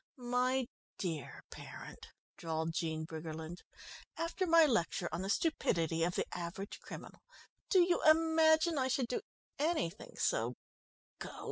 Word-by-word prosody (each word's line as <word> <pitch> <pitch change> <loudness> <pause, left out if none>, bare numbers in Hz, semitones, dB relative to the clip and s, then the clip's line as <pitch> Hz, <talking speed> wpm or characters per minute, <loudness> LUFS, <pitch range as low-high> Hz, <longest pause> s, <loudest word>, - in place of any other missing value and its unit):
"My 250 +1 +1 0.3
dear 160 - -4
parent," - - -9 0.3
drawled 160 0 -2
Jean 160 -2 -2
Briggerland, 160 +1 -6 0.6
"after 335 +3 -1
my 330 -1 +7
lecture 195 - +1
on 170 - -2
the 190 - -3
stupidity 165 - +1
of 175 +1 0
the - - +1
average 180 +4 -5
criminal, - - -10 0.5
do 375 - +6
you 350 0 +3
imagine 320 0 +5
I 260 - +2
should 260 -2 0
do 250 - -1 0.4
anything 305 - -1
so 115 +3 +1 0.6
gauche?" - - -6
220 Hz, 130 wpm, -34 LUFS, -, 0.6 s, my